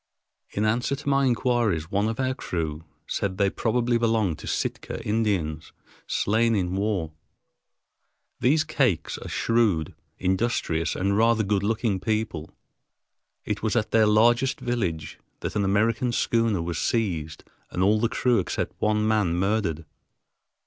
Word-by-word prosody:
In 105 - -1
answer 120 +5 +1
to 145 - -11
my 140 -1 +3
inquiries, 120 - +1
one 100 +2 +1
of 115 - -4
our 130 0 +1
crew 80 -9 -4 0.2
said 95 -2 -2
they 100 -1 +2
probably 120 +1 +1
belonged 110 -8 +1
to - - -9
Sitka - - -3
Indians, 100 -8 -1 0.3
slain 115 +2 +2
in 90 -2 -1
war. 95 -5 -1 1.3
These 155 +5 +3
Kakes 130 - 0
are - - -7
shrewd, 110 -9 +1 0.2
industrious, 95 -4 0
and 100 +2 0
rather 115 +1 +3
good 100 -1 +1
looking 105 -1 0
people. 105 -6 -2 1.0
It - - -2
was 110 0 0
at 110 -2 0
their 110 -1 +4
largest 120 +5 +3
village 95 -11 -3 0.2
that - - -4
an 105 - +1
American 110 +5 +1
schooner 115 -6 +1
was 85 -1 -3
seized 85 -9 -1 0.3
and 90 - -1
all 105 +3 +4
the 115 +1 +1
crew 125 -2 +2
except 90 - -2
one 105 0 +2
man 105 -6 +2
murdered. 95 -4 0
105 Hz, 140 wpm, -25 LUFS, 95-115 Hz, 1.3 s, their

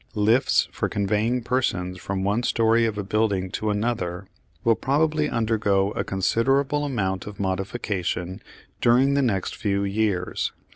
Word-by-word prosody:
Lifts 110 +5 +3
for - - -2
conveying 105 +5 0
persons 90 -8 -1
from 95 +1 -3
one 100 +4 +1
storey 115 -1 +2
of 105 -2 -3
a 100 - -2
building 100 -2 0
to 110 - -2
another 105 -4 -2 0.4
will 115 - +4
probably 150 +4 +1
undergo 105 -4 +1
a - - -2
considerable 135 +9 +1
amount 95 -9 -2
of 105 - -9
modification 95 -2 -2 0.4
during 130 +4 +4
the 140 - +2
next 100 -8 -1
few 100 -1 -1
years. 100 -2 -1
105 Hz, 140 wpm, -24 LUFS, 95-120 Hz, 0.4 s, will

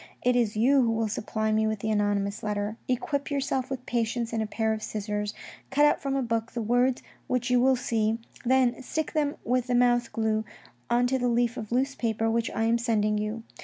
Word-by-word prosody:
" - - -36
It 250 0 +3
is 225 -4 +1
you 265 +5 +4
who 235 - +2
will 225 0 0
supply 215 +1 -2
me 220 0 +2
with 220 0 -1
the 220 - -1
anonymous 205 -1 0
letter. 210 0 -2
Equip 280 +3 -1
yourself 270 -2 -1
with 260 -2 -5
patience 235 0 -1
and 225 - 0
a 220 - -2
pair 220 +1 0
of 215 - -4
scissors, 210 -1 -3 0.3
cut 290 +2 +4
out 295 - +3
from 275 -1 -1
a 270 - +1
book 230 0 -2
the 235 - -2
words 245 +3 +2 0.2
which 250 0 -1
you 250 -1 +4
will 265 +1 +4
see, 225 -2 0 0.3
then 255 0 +2
stick 315 +4 -3
them 295 -2 0
with 250 +1 +1
the 250 - +1
mouth 240 -1 +3
glue 220 -1 0 0.5
on 240 +1 +3
to 260 +1 +1
the 245 - +1
leaf 235 0 +1
of 215 0 -6
loose 265 +3 +1
paper 225 -2 0
which 230 0 0
I 225 - -2
am 230 +1 +2
sending 215 -3 +1
you. 215 +2 -3
235 Hz, 225 wpm, -27 LUFS, 220-250 Hz, 0.5 s, you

